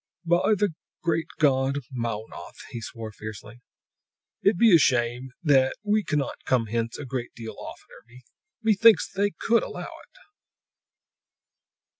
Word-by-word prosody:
"By 175 Hz, +5 st, +3 dB
the 200 Hz, -3 st, +1 dB, 0.3 s
great 165 Hz, -2 st, 0 dB
god 135 Hz, -2 st, +2 dB
Mownoth!" 115 Hz, -3 st, -5 dB
he 115 Hz, -, -6 dB
swore 115 Hz, -1 st, -7 dB
fiercely. 110 Hz, +2 st, -10 dB, 0.8 s
"It 200 Hz, -2 st, +3 dB
be 220 Hz, -2 st, +7 dB
a -, -, +7 dB
shame 125 Hz, -1 st, +1 dB
that 135 Hz, -4 st, +4 dB
we 210 Hz, 0 st, +2 dB
cannot 150 Hz, -5 st, -2 dB
come 125 Hz, -3 st, +1 dB
hence 115 Hz, +1 st, -2 dB
a 145 Hz, -, -7 dB
great 125 Hz, -2 st, -5 dB
deal 115 Hz, -1 st, -8 dB
oftener! -, -, -11 dB, 0.6 s
Me 220 Hz, -1 st, +4 dB
thinks 225 Hz, +2 st, +5 dB
They 200 Hz, +1 st, +1 dB
could 230 Hz, 0 st, +3 dB
allow -, -, -6 dB, 0.2 s
it!" -, -, -22 dB
135 Hz, 135 wpm, -26 LUFS, 120-180 Hz, 0.8 s, be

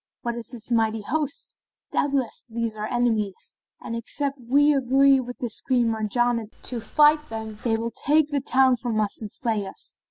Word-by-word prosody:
What 235 Hz, -, -1 dB
is 235 Hz, -1 st, -7 dB
this 240 Hz, -1 st, -8 dB
mighty 225 Hz, -2 st, +1 dB
host? 295 Hz, +4 st, -3 dB, 0.4 s
Doubtless, 275 Hz, -4 st, -1 dB
these 230 Hz, -1 st, -3 dB
are 215 Hz, 0 st, -4 dB
enemies, 220 Hz, -5 st, -1 dB, 0.3 s
and 230 Hz, -, -4 dB
except 275 Hz, +4 st, -2 dB
we 285 Hz, +5 st, +4 dB
agree 270 Hz, 0 st, +4 dB
with 245 Hz, -1 st, -6 dB
this 235 Hz, -3 st, -1 dB
Queen 245 Hz, -3 st, +2 dB
Marjanah 230 Hz, +1 st, 0 dB, 0.2 s
to 240 Hz, -2 st, -1 dB
fight 300 Hz, +6 st, +3 dB
them, 220 Hz, -1 st, -6 dB
they 225 Hz, -2 st, +1 dB
will 230 Hz, +1 st, -3 dB
take 300 Hz, +5 st, +2 dB
the 285 Hz, -1 st, 0 dB
town 260 Hz, -1 st, +3 dB
from 235 Hz, -2 st, -2 dB
us 210 Hz, 0 st, -1 dB
and 215 Hz, -, -5 dB
slay 220 Hz, -5 st, -1 dB
us. -, -, -8 dB
240 Hz, 180 wpm, -24 LUFS, 225-270 Hz, 0.4 s, we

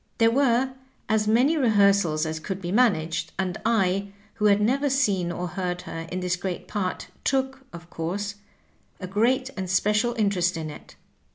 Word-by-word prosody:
There 225 Hz, -1 st, +4 dB
were 260 Hz, 0 st, +2 dB, 0.3 s
as 215 Hz, -1 st, +1 dB
many 255 Hz, +9 st, +3 dB
rehearsals 200 Hz, -, +3 dB
as 160 Hz, 0 st, -3 dB
could 190 Hz, +4 st, -5 dB
be 175 Hz, -2 st, -4 dB
managed, 180 Hz, -8 st, +1 dB
and 185 Hz, -2 st, -2 dB
I, 195 Hz, -3 st, +1 dB, 0.2 s
who 215 Hz, -2 st, -2 dB
had 205 Hz, -1 st, +5 dB
never 270 Hz, +7 st, +2 dB
seen 200 Hz, -11 st, +1 dB
or 175 Hz, +1 st, -4 dB
heard 180 Hz, +1 st, -3 dB
her 165 Hz, 0 st, -6 dB
in 185 Hz, +1 st, -3 dB
this 180 Hz, 0 st, 0 dB
great 180 Hz, 0 st, -5 dB
part, 195 Hz, -4 st, -3 dB
took, 265 Hz, 0 st, -1 dB
of 170 Hz, 0 st, -10 dB
course, 195 Hz, +5 st, -3 dB, 0.7 s
a 185 Hz, -, -5 dB
great 240 Hz, +7 st, +1 dB
and 190 Hz, -2 st, -4 dB
special 210 Hz, +5 st, +2 dB
inter 205 Hz, -5 st, 0 dB
est 175 Hz, 0 st, +1 dB
in 155 Hz, -1 st, -4 dB
it. -, -, -13 dB
200 Hz, 175 wpm, -25 LUFS, 180-235 Hz, 0.7 s, had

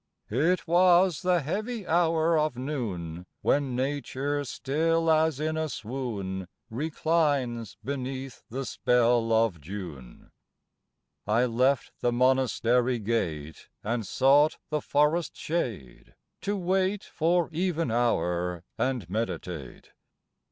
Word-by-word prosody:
It 165 Hz, +12 st, +1 dB
was 175 Hz, 0 st, +4 dB
the 180 Hz, -2 st, +2 dB
heavy 210 Hz, -, -3 dB
hour 165 Hz, -1 st, +2 dB
of 155 Hz, -5 st, +1 dB
noon, 95 Hz, -, -4 dB, 0.2 s
When 140 Hz, -3 st, +1 dB
Nature 140 Hz, +1 st, -2 dB
still 165 Hz, +5 st, +1 dB
as 160 Hz, -2 st, +2 dB
in 155 Hz, +1 st, -1 dB
a 160 Hz, 0 st, -1 dB
swoon 105 Hz, -8 st, -4 dB, 0.2 s
Reclines 145 Hz, -, 0 dB
beneath 130 Hz, -1 st, -5 dB
the 135 Hz, +3 st, -4 dB
spell 120 Hz, -2 st, +2 dB
of 110 Hz, -7 st, +2 dB
June. 75 Hz, -7 st, -9 dB, 1.0 s
I 115 Hz, +4 st, +3 dB
left 125 Hz, +3 st, +1 dB
the 120 Hz, -, +1 dB
Monastery 125 Hz, -1 st, +2 dB
gate, 85 Hz, -9 st, -3 dB
And 115 Hz, +2 st, -1 dB
sought 140 Hz, +6 st, +4 dB
the 150 Hz, -1 st, 0 dB
forest 150 Hz, +5 st, +1 dB
shade, 115 Hz, -, -4 dB, 0.3 s
to 205 Hz, +1 st, -1 dB
wait 190 Hz, +2 st, 0 dB
For 170 Hz, +1 st, +1 dB
even 165 Hz, -4 st, -1 dB
hour, 90 Hz, -7 st, 0 dB, 0.2 s
and 125 Hz, -8 st, -1 dB
meditate. 90 Hz, -, -5 dB
130 Hz, 110 wpm, -28 LUFS, 115-160 Hz, 1.0 s, was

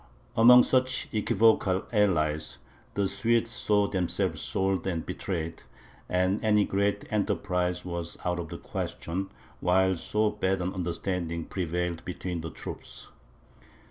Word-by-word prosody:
Among 125 Hz, +2 st, +8 dB
such 130 Hz, 0 st, +1 dB
equivocal 105 Hz, -3 st, +3 dB
allies, 80 Hz, -7 st, +1 dB, 0.4 s
the 100 Hz, -1 st, +1 dB
Swedes 115 Hz, +3 st, +1 dB
saw 105 Hz, -3 st, +2 dB
themselves 95 Hz, -3 st, -1 dB
sold 95 Hz, 0 st, 0 dB
and 85 Hz, -4 st, -2 dB
betrayed; 85 Hz, -4 st, -4 dB, 0.5 s
and 90 Hz, +2 st, +1 dB
any 105 Hz, -2 st, +4 dB
great 100 Hz, +1 st, 0 dB
enterprise 90 Hz, -4 st, 0 dB
was 85 Hz, -2 st, -4 dB
out 90 Hz, 0 st, 0 dB
of 85 Hz, -2 st, -5 dB
the -, -, -6 dB
question, 95 Hz, +4 st, -4 dB, 0.3 s
while 95 Hz, +1 st, +3 dB
so 105 Hz, +4 st, 0 dB
bad 95 Hz, -2 st, 0 dB
an 90 Hz, +1 st, -2 dB
understanding 85 Hz, -2 st, -2 dB
prevailed 90 Hz, -2 st, -2 dB
between 90 Hz, -1 st, -4 dB
the 80 Hz, -, -5 dB
troops. -, -, -9 dB
95 Hz, 125 wpm, -28 LUFS, 85-105 Hz, 0.5 s, Among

